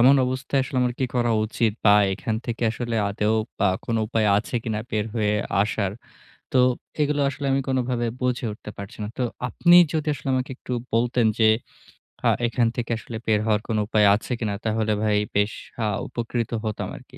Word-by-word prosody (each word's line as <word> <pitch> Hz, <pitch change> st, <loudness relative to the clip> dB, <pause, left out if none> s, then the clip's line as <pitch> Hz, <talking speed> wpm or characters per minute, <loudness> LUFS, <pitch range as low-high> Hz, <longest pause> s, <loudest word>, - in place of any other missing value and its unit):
এমন 130 Hz, +4 st, +7 dB
অবস্থায় 130 Hz, +2 st, -1 dB
আসলে 130 Hz, 0 st, -3 dB
আমার 125 Hz, -1 st, 0 dB
কি 130 Hz, -, +1 dB
করা 120 Hz, -1 st, +2 dB
উচিত? 110 Hz, 0 st, 0 dB
বা 100 Hz, -, +8 dB, 0.2 s
এখান 110 Hz, +3 st, -2 dB
থেকে 120 Hz, 0 st, -3 dB
আসলে 115 Hz, 0 st, -3 dB
আদৌ 105 Hz, +2 st, 0 dB, 0.3 s
আ -, -, +4 dB, 0.2 s
কোনো 115 Hz, -1 st, 0 dB
উপায় 110 Hz, -1 st, +1 dB
আছে 110 Hz, -, -6 dB
কিনা, 110 Hz, -2 st, -2 dB
বের 105 Hz, -1 st, -1 dB
হয়ে 105 Hz, -2 st, +1 dB, 0.3 s
আসার? 100 Hz, -2 st, -1 dB, 0.6 s
তো 130 Hz, -, +4 dB, 0.4 s
এগুলো 145 Hz, 0 st, +1 dB
আসলে 140 Hz, +1 st, -4 dB
আমি 135 Hz, -, +2 dB
কোনোভাবে 125 Hz, -2 st, 0 dB
বুঝে 125 Hz, -1 st, 0 dB
উঠতে 105 Hz, 0 st, -9 dB
পারছি 100 Hz, 0 st, -9 dB
না। 105 Hz, -, -3 dB
তো -, -, 0 dB, 0.3 s
আপনি 175 Hz, 0 st, +5 dB, 0.2 s
যদি 160 Hz, -1 st, -1 dB
আসলে 140 Hz, -, -7 dB
আমাকে 130 Hz, 0 st, -1 dB
একটু 130 Hz, -, -7 dB, 0.2 s
বলতেন 120 Hz, 0 st, +2 dB
যে, 110 Hz, -, +6 dB, 0.8 s
আ -, -, +6 dB, 0.2 s
এখান 120 Hz, 0 st, +1 dB
থেকে 120 Hz, -1 st, -3 dB
আসলে 115 Hz, 0 st, -7 dB
বের 110 Hz, -2 st, +3 dB
হওয়ার 105 Hz, -1 st, +2 dB
কোনো 110 Hz, -2 st, 0 dB
উপায় 105 Hz, -2 st, +4 dB
আছে 110 Hz, -, -6 dB
কিনা? 105 Hz, -3 st, -1 dB
তাহলে 110 Hz, 0 st, 0 dB
ভাই 105 Hz, -1 st, +2 dB, 0.2 s
বেশ 105 Hz, +1 st, +2 dB, 0.3 s
আ -, -, +1 dB, 0.2 s
উপকৃত 120 Hz, -1 st, -3 dB
হতাম 110 Hz, -1 st, -3 dB
আরকি। -, -, -15 dB
115 Hz, 190 wpm, -24 LUFS, 110-125 Hz, 0.8 s, বা